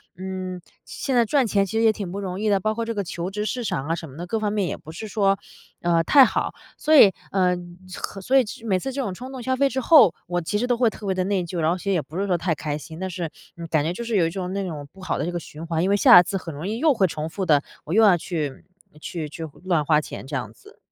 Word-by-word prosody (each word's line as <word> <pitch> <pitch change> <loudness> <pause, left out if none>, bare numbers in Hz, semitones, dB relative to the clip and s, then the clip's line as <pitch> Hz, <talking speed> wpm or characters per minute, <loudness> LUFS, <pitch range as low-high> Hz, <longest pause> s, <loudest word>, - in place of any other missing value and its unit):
嗯， 185 -1 -5 0.2
现 270 - -4
在 235 - +4
赚 270 +2 +2
钱 200 -2 +2
其 - - -8
实 225 - +2
也 220 - +6
挺 200 -4 -6
不 200 - -4
容 185 0 -4
易 215 - -1
的， 200 -1 +3
包 215 +2 0
括 230 +1 -3
这 230 - -3
个 200 -2 -2
求 175 +1 -4
职 210 +1 -3
市 245 +2 -2
场 135 -5 -2
啊 165 - 0
什 165 -3 -8
么 130 - -13
的， 175 - -5
各 220 +4 -1
方 210 -1 -1
面 200 -4 0
也 - - -4
不 155 - -15
是 175 +7 -7
说， 195 -1 +2 0.4
呃， 170 -1 +3
太 280 -2 +8
好。 235 - 0 0.2
所 310 +1 +3
以 205 -8 +9 0.2
呃， 180 -2 +2 0.4
和 195 - -6
所 265 +7 +3
以 250 - +2 0.2
每 190 -4 +1
次 270 +6 -4
这 275 - -2
种 200 -7 -3
冲 255 +7 -8
动 250 -2 -7
消 260 +1 0
费 280 0 +4
之 265 -1 -2
后， 235 - +7
我 175 0 -1
其 205 +5 -2
实 245 - 0
都 245 -1 +1
会 235 -2 +3
特 210 - -10
别 190 - +1
地 185 0 0
内 195 -2 0
疚， 170 0 -5
然 155 - +2
后 175 - +1
心 200 +2 -2
里 - - +2
也 160 - +1
不 160 +5 -10
是 200 - 0
说 180 -2 +2
太 165 -1 -1
开 150 0 -3
心。 160 +2 -10
但 190 0 -3
是 175 -3 -4 0.3
嗯， 170 -1 -7
感 155 -2 +2
觉 165 - -1
就 210 - -6
是 230 -2 -1
有 175 - +4
一 - - -2
种 185 0 -4
那 200 0 -2
种 150 -5 -6
不 190 - -15
好 - - -2
的 - - -2
这 175 - -2
个 175 - -3
循 155 +3 -9
环， 165 0 -1
因 190 - +1
为 200 - +3
下 180 - +9
一 - - -2
次 195 - -3
很 170 -3 -7
容 155 +5 -6
易 220 +2 -2
又 305 +1 +4
会 195 -5 +2
重 155 0 -4
复 190 +2 -3
的， 145 -4 +4 0.2
我 160 - -5
又 225 - +5
要 200 -4 +7
去 155 -5 -4 0.4
去 160 -4 -5
去 160 +2 -8 0.2
乱 170 -5 +2
花 150 0 +3
钱 150 - -7
这 140 +1 -5
样 110 -4 -6
子。 - - -19
185 Hz, 335 characters per minute, -23 LUFS, 165-215 Hz, 0.4 s, 以